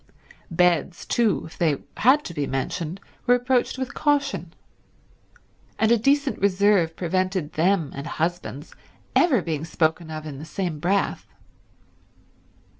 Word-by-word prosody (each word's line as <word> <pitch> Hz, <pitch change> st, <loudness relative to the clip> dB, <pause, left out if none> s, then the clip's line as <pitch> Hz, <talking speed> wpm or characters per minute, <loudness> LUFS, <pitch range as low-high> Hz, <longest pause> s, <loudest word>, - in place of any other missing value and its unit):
Beds 175 Hz, 0 st, +1 dB
too, 230 Hz, -4 st, +1 dB
if 160 Hz, -, -13 dB
they 155 Hz, -5 st, +2 dB, 0.2 s
had 270 Hz, +6 st, +4 dB
to 170 Hz, -, -6 dB
be 145 Hz, -3 st, -2 dB
mentioned, 155 Hz, +6 st, -3 dB, 0.3 s
were 245 Hz, -, +6 dB
approached 245 Hz, +1 st, +1 dB
with 260 Hz, -1 st, -4 dB
caution; 280 Hz, -, 0 dB, 1.3 s
and 220 Hz, +1 st, +2 dB
a 235 Hz, -, +6 dB
decent 280 Hz, +3 st, +2 dB
reserve 195 Hz, -4 st, +3 dB
prevented 185 Hz, -2 st, -1 dB
them 170 Hz, -2 st, +1 dB
and 140 Hz, +3 st, -6 dB
husbands 165 Hz, -3 st, -3 dB, 0.4 s
ever 270 Hz, -, +4 dB
being 155 Hz, -3 st, -3 dB
spoken 160 Hz, 0 st, 0 dB
of 155 Hz, 0 st, -6 dB
in 140 Hz, -3 st, -7 dB
the -, -, -8 dB
same 170 Hz, -1 st, -3 dB
breath. 195 Hz, +5 st, 0 dB
180 Hz, 130 wpm, -24 LUFS, 160-220 Hz, 1.3 s, were